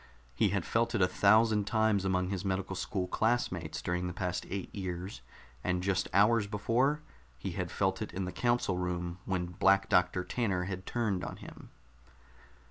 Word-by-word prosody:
He 100 - +2
had 100 -2 -1
felt 115 +1 +1
it 105 - +1
a - - +5
thousand 105 +2 +4
times 110 -3 +2
among 90 -1 +1
his 95 -2 -3
medical 95 -1 -2
school 95 0 -2
classmates 90 -7 -1
during 90 +1 -1
the 90 - -4
past 90 -2 -2
eight 100 -1 -5
years, 90 -4 -5 0.4
and 90 -1 0
just 95 -1 +1
hours 105 +2 +4
before 125 +8 +1 0.3
he - - -4
had - - -3
felt - - 0
it - - -4
in 95 0 -3
the 90 - -4
council 120 -2 +1
room 90 0 -3
when 95 -2 -1
Black 95 +2 +3
Doctor 90 0 +3
Tanner 100 -5 -1
had 95 0 -5
turned 105 -6 -1
on - - -5
him. - - -12
95 Hz, 175 wpm, -31 LUFS, 90-105 Hz, 0.4 s, a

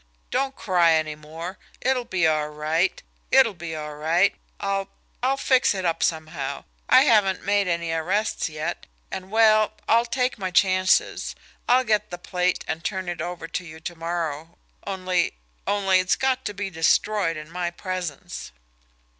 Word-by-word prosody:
"Don't 270 +1 0
cry 175 -4 +3
any 155 -1 +1
more. 160 +5 -8 0.2
It'll 255 -1 +1
be 180 -6 +1
all 155 -1 +2
right 155 +4 0 0.3
it'll 260 -5 +5
be 170 -2 -6
all 150 -1 -5
right. 165 +6 +2 0.3
I'll 195 0 -1 0.3
I'll 265 +2 +2
fix 260 -6 +3
it 190 -1 -3
up 165 -1 0
somehow. 155 -4 -2 0.3
I 260 - +8
haven't 210 -8 +3
made 200 -1 +2
any 170 -1 -1
arrests 185 +6 0
yet, 155 0 -4 0.2
and 190 0 -6
well, 215 0 +4
I'll 230 +1 +4
take 250 -1 0
my 190 -1 -2
chances. 185 0 +2 0.3
I'll 255 +1 +5
get 215 -3 +1
the 175 - -6
plate 180 0 -1
and 160 +1 -3
turn 190 -2 -3
it 175 -2 -4
over 175 0 -5
to 180 - -3
you 160 -2 -10
to 175 +1 -6
morrow, 165 -1 -4 0.3
only 185 -2 0 0.3
only 195 -2 +3
it's 185 0 +2
got 260 -1 0
to 205 - -2
be 200 -1 -4
destroyed 165 +1 +2
in 155 +1 -9
my 175 0 -2
presence." 180 - -5
180 Hz, 165 wpm, -24 LUFS, 165-205 Hz, 0.3 s, I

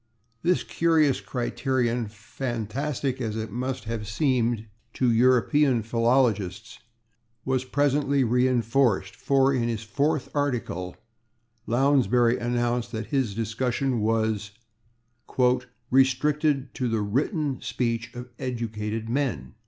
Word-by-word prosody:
This 180 +1 +2
curious 160 -5 +2
criterion, 120 -2 -1
fantastic 120 +5 -4
as 110 -3 -2
it 110 0 -4
must 130 0 -3
have 110 -2 -4
seemed 120 -2 0 0.3
to 130 - +1
[Pg011] 115 - +3
European 125 +1 +3
philologists, 115 -3 0 0.7
was 130 -1 0
presently 140 0 +1
reinforced, 120 -4 +2
for 135 0 +2
in 120 -3 0
his 115 -1 -3
fourth 140 +7 0
article 120 - -2 0.7
Lounsbury 125 -1 +3
announced 120 0 -1
that 110 -1 -3
his 130 -8 0
discussion 120 +3 -1
was 110 -1 0 1.4
"restricted 135 +1 +2
to 125 - -2
the 110 -2 0
/written/ 140 - -1
speech 115 -1 -2
of 125 +1 -7
educated 115 -3 -3
men." 135 +2 -2
125 Hz, 105 wpm, -26 LUFS, 115-135 Hz, 1.4 s, Pg011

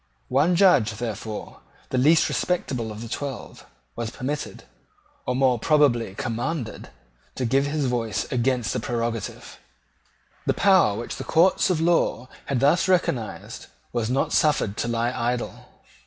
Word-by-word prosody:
One 150 +7 +3
Judge, 165 - +4
therefore, 110 -1 -6 0.3
the 130 - +1
least 155 +5 +5
respectable 125 -10 -2
of 105 +2 -7
the - - -6
twelve, 135 +2 -6 0.3
was 115 -1 -3
permitted, 140 +5 -5 0.6
or 125 - 0
more 130 -2 +3
probably 120 -9 +2
commanded, 120 +2 -4 0.5
to 130 - -2
give 135 +4 +2
his 145 -1 -1
voice 120 -4 -1
against 125 -2 0
the - - -1
prerogative. 115 0 -4 0.9
The - - +2
power 185 - +4
which 120 - -5
the - - -5
courts 175 +5 +3
of 180 -4 +1
law 165 -6 +1 0.2
had 135 -3 0
thus 155 +7 +3
recognised 140 - -1 0.3
was 120 -2 -1
not 135 +2 0
suffered 140 -9 +2
to - - -1
lie 120 0 0
idle. 120 -1 -3
125 Hz, 140 wpm, -24 LUFS, 115-150 Hz, 0.9 s, least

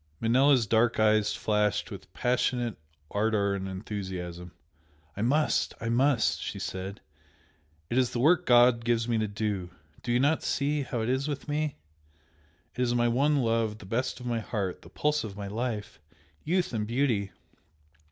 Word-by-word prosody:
Manella's 130 +1 +4
dark 115 +3 +2
eyes 110 -1 +3
flashed 105 -2 0
with - - -10
passionate 125 -1 0 0.4
ardour 105 -1 +1
and 95 -1 -3
enthusiasm. 95 -3 -6 0.6
"I 105 - -4
must 145 +7 +1
I 115 - -3
must!" 125 -1 +2
she - - -4
said 95 +2 -5 0.9
"It 120 - +1
is 125 -2 +2
the - - -4
work 175 +7 +4
God 120 -1 +5
gives 115 0 +1
me 115 -2 +1
to 110 - 0
do! 100 -3 -3 0.3
Do 120 - -3
you 120 - +3
not 145 +4 +2
see 145 +1 0
how 125 -3 -3
it 110 - -1
is 130 +2 0
with 145 0 -4
me? 150 0 -1 1.0
It 125 - -3
is 120 -1 +1
my 120 0 +3
one 140 +3 +2
love 115 -2 0
the 105 - -12
best 120 +8 -2
of 125 - -9
my 120 -1 -1
heart! 100 -5 -3
the - - -14
pulse 150 0 0
of 100 -3 -7
my 100 -1 -5
life! 110 0 -4 0.4
Youth 175 -2 0
and 105 -2 -1
beauty! 115 -5 0
115 Hz, 170 wpm, -28 LUFS, 105-130 Hz, 1.0 s, God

